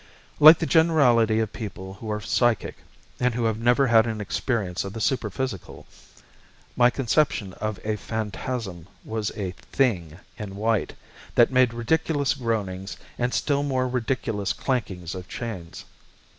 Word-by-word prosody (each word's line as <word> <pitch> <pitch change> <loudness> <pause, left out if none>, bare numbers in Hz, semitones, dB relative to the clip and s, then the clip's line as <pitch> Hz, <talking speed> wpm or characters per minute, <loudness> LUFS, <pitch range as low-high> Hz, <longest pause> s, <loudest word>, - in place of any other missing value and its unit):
Like 155 +2 +10
the 165 - -2
generality 125 -10 +4
of 110 - -3
people 95 -3 -7
who 110 +3 -8
are 105 0 -1
psychic 115 +1 0 0.4
and 125 -2 +1
who 120 - -1
have 110 -1 0
never 120 +4 +3
had 115 -2 +5
an 110 -1 -3
experience 105 -3 -2
of 95 - -6
the 115 - -6
superphysical, 110 - -3 0.9
my 120 0 +5
conception 125 -5 0
of 110 -2 -2
a 110 0 -1
phantasm 110 -4 -4 0.2
was 110 -1 -2
a 95 -3 -3 0.2
"thing" 90 - 0 0.2
in 100 -3 -6
white 110 0 0 0.4
that 120 - +5
made 130 -2 +4
ridiculous 140 +4 0
groanings 105 -7 -3 0.2
and 120 +1 0
still 140 +1 +1
more 130 -3 0
ridiculous 120 -5 -1
clankings 95 -9 -3
of 90 -1 -8
chains. 100 -8 -7
115 Hz, 145 wpm, -25 LUFS, 100-130 Hz, 0.9 s, Like